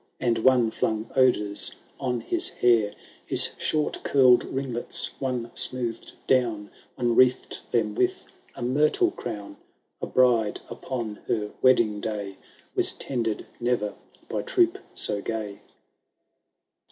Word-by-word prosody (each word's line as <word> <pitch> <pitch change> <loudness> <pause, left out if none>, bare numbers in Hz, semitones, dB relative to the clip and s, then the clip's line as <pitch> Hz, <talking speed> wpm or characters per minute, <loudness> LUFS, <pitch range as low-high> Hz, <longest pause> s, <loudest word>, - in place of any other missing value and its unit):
And 120 -2 +1
one 120 -1 +4
flung 110 0 -2
odours 105 -6 +2 0.2
on 125 -3 -2
his 350 0 -1
hair; 115 -4 +2 0.3
His - - +3
short 155 -1 0
curPd 130 -3 +5
ringlets 130 -3 -1
one 125 -3 -2
smoothM 120 -3 -1
down, 115 -6 +1 0.2
One 120 -2 0
wreathed 130 0 +3
them 110 -3 0
with - - 0 0.3
a - - -6
myrtle 150 - +2
crown. 100 - -7 0.4
A - - -3
bride 120 -4 +2
upon 115 -5 -5
her 105 -2 -1
wedding 115 -5 +4
day. 100 -3 -4 0.3
Was - - +3
tended 115 -5 -3
ne*er 120 -4 0 0.3
by - - -2
troop - - +2 0.2
so 100 - +1
gay. 105 -2 -4
120 Hz, 120 wpm, -26 LUFS, 105-130 Hz, 0.4 s, curPd